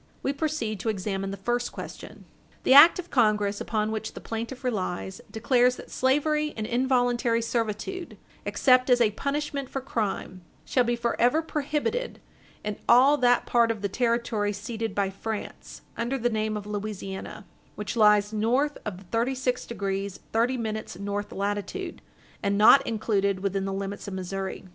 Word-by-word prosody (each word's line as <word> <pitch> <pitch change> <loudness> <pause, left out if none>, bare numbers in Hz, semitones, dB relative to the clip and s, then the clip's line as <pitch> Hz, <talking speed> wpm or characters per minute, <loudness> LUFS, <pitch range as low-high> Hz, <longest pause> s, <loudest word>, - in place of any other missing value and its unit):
We 275 - 0
proceed 280 -8 -2
to 225 - -2
examine 195 -1 -2
the 195 - -5
first 240 +5 -1
question. - - -9 0.4
The - - +5
act 290 +5 +9
of 360 -1 -7
Congress 210 -4 +2
upon 215 -1 -1
which 220 0 -4
the - - -6
plaintiff 230 +4 -5
relies 190 -5 -3
declares 245 +3 +2
that - - -12
slavery 300 +3 +1
and 215 - -2
involuntary 245 -1 +1
servitude, 230 - -3 0.3
except 255 -1 +3
as 245 -1 +5
a 225 -3 +4
punishment 280 +3 -3
for 270 - -3
crime, 210 -7 -3 0.2
shall 250 -2 +2
be 240 0 +1
forever 240 +5 +1
prohibited 310 - -2 0.4
in 210 -1 -3
all 260 +5 +7
that 245 -2 +3
part 235 -1 +3
of 220 -3 -3
the 200 - 0
territory 230 -2 0
ceded 220 +1 -4
by 195 -1 0
France, 215 +2 -6
under 240 +4 -1
the 240 -1 0
name 215 -1 -1
of 205 - -7
Louisiana, 205 0 -6 0.3
which 210 +1 -4
lies 210 -1 +4
north 250 +7 +1
of 190 -3 -6
thirty 235 +4 +1
six 250 -1 -1
degrees 195 -3 -3
thirty 240 +3 +2
minutes 220 -5 -4
north 205 +1 -4
latitude, 205 - -3 0.4
and 200 -1 0
not 225 +6 +7
included 200 -4 0
within 195 0 -1
the 195 - -2
limits 195 +1 -5
of 195 - -5
Missouri. 190 +1 -4
225 Hz, 160 wpm, -26 LUFS, 205-255 Hz, 0.4 s, act